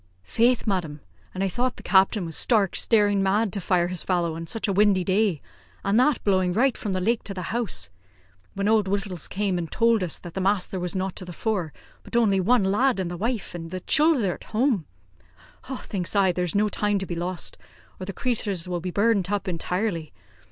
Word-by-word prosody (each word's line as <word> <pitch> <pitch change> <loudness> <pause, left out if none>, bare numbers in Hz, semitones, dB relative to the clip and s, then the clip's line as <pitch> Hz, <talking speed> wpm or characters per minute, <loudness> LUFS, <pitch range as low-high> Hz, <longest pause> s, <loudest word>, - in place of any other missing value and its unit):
"Faith, 235 - +2
madam! 175 -7 -2 0.4
an' 190 - -1
I - - +2
thought 245 +7 -1
the - - -12
captain 190 0 +3
was 165 -2 -6
stark, 210 -6 +2
staring 205 -3 +3
mad 200 +2 +1
to 200 - -1
fire 175 0 +2
his 180 -2 -2
fallow 175 -3 0
on 165 0 -6
such 225 +6 -2
a 200 - +1
windy 200 -2 +4
day, 190 -3 +1 0.4
and 200 +4 +3
that 265 +1 +2
blowing 185 -3 +2
right 250 +5 +2
from 205 - -3
the 185 - 0
lake 225 +5 +1
to 195 - -6
the 185 +2 -5
house. 235 - -2 0.6
When 200 +1 -1
Old 215 -2 +3
Wittals 195 -4 -2
came 195 -2 -1
in 170 - -2
and - - -13
towld 230 -3 +3
us 170 - -1
that 175 -2 -10
the 190 - -3
masther 190 -1 0
was 180 +1 -3
not 190 0 -2
to - - -7
the 180 - -8
fore, 185 -4 -2 0.3
but - - -10
only 210 -5 +3
one 225 +4 +3
lad, 210 +5 +2
an' 185 -2 -2
the 175 - -5
wife 225 +3 -3
an' 165 -1 -6
the 185 +2 -4
chilther 295 - +3
at - - -12
home, 220 - 0 0.9
thinks 185 -1 -4
I, 195 -2 +4
there's 180 -1 -2
no 210 +1 +3
time 205 0 0
to 190 - -3
be 180 - -5
lost, 175 +1 -4 0.4
or 185 - -6
the - - -3
crathurs 205 -8 -2
will 175 -1 -3
be 180 - -3
burnt 200 -1 +1
up 205 -1 -1
intirely. 180 -1 -2
195 Hz, 215 wpm, -25 LUFS, 180-215 Hz, 0.9 s, windy